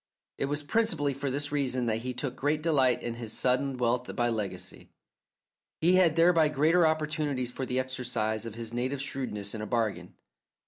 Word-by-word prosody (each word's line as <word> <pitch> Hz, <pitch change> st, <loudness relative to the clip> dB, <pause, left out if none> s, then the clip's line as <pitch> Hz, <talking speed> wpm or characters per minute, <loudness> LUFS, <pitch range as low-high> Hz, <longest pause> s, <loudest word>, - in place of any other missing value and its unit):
It -, -, +1 dB
was 145 Hz, +1 st, -2 dB
principally 155 Hz, -6 st, +1 dB
for 140 Hz, +1 st, -3 dB
this 145 Hz, +2 st, -1 dB
reason 130 Hz, -4 st, 0 dB
that 110 Hz, -2 st, +1 dB
he 125 Hz, +2 st, -3 dB
took 125 Hz, 0 st, -3 dB
great 150 Hz, +3 st, 0 dB
delight 135 Hz, -7 st, +3 dB
in 120 Hz, -, -2 dB
his 110 Hz, -2 st, -5 dB
sudden 130 Hz, +1 st, +1 dB
wealth 125 Hz, 0 st, 0 dB
by 120 Hz, 0 st, +1 dB
legacy. 100 Hz, -5 st, -4 dB, 0.9 s
He 170 Hz, +3 st, +4 dB
had 170 Hz, -4 st, +4 dB
thereby 165 Hz, -1 st, +5 dB
greater 160 Hz, +4 st, +4 dB
opportunities 150 Hz, -5 st, -1 dB
for 130 Hz, +1 st, -4 dB
the 130 Hz, +1 st, 0 dB
exercise 120 Hz, -4 st, -2 dB
of 110 Hz, -, -7 dB
his 115 Hz, -1 st, -6 dB
native 130 Hz, +3 st, -1 dB
shrewdness 130 Hz, -8 st, -4 dB
in 110 Hz, -, -5 dB
a 110 Hz, -, -4 dB
bargain. 115 Hz, -4 st, -2 dB
130 Hz, 180 wpm, -29 LUFS, 120-150 Hz, 0.9 s, thereby